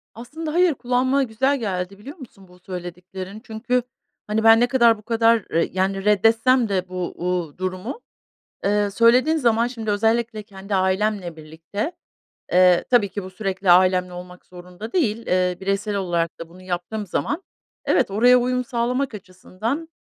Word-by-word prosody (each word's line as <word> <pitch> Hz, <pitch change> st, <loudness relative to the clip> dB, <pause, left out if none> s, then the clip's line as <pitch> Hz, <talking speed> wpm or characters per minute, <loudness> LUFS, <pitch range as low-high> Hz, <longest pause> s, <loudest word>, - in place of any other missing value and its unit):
Aslında 300 Hz, +7 st, -6 dB
hayır, 355 Hz, -2 st, +4 dB
kulağıma 260 Hz, +2 st, +1 dB
güzel 265 Hz, +4 st, 0 dB
geldi 195 Hz, -2 st, -4 dB
biliyor 280 Hz, -, -10 dB
musun 210 Hz, -, -14 dB
bu 180 Hz, 0 st, -19 dB
söylediklerin. 185 Hz, +2 st, -8 dB
Çünkü, 245 Hz, +3 st, -1 dB, 0.5 s
hani, 215 Hz, +1 st, 0 dB
ben 225 Hz, 0 st, +7 dB
ne 245 Hz, -, +3 dB
kadar 235 Hz, -3 st, +4 dB
bu -, -, -15 dB
kadar, 230 Hz, -1 st, +2 dB
eee, 165 Hz, +1 st, +1 dB
yani, 195 Hz, +1 st, -1 dB
reddetsem 225 Hz, +3 st, +3 dB
de 185 Hz, -2 st, -1 dB
bu, 180 Hz, -1 st, -4 dB
uuu, 175 Hz, -4 st, -3 dB
durumu, 185 Hz, -, -5 dB, 0.6 s
eee, 205 Hz, 0 st, +1 dB
söylediğin 245 Hz, +9 st, +4 dB
zaman 235 Hz, -4 st, +2 dB
şimdi 230 Hz, -3 st, -4 dB
özellikle 225 Hz, +1 st, 0 dB
kendi 200 Hz, 0 st, -7 dB
ailemle 190 Hz, -2 st, 0 dB
birlikte, 165 Hz, -, -6 dB, 0.6 s
eee, 180 Hz, -1 st, +5 dB
tabii 235 Hz, -6 st, +3 dB
ki 200 Hz, 0 st, -5 dB
bu 185 Hz, -, -8 dB
sürekli 190 Hz, -1 st, -1 dB
ailemle 180 Hz, 0 st, +4 dB
olmak 180 Hz, 0 st, -11 dB
zorunda 180 Hz, +5 st, -11 dB
değil, 230 Hz, -, 0 dB
eee, 180 Hz, -1 st, +1 dB
bireysel 195 Hz, +2 st, -2 dB
olarak 170 Hz, -4 st, -2 dB
da 165 Hz, 0 st, -8 dB
bunu 185 Hz, +2 st, -15 dB
yaptığım 185 Hz, +3 st, -4 dB
zaman 310 Hz, -, -2 dB, 0.4 s
evet, -, -, +2 dB
oraya 245 Hz, +5 st, +5 dB
uyum 250 Hz, +1 st, 0 dB
sağlamak 250 Hz, +2 st, -1 dB
açısından, 210 Hz, -, -5 dB
210 Hz, 155 wpm, -22 LUFS, 185-235 Hz, 0.6 s, ben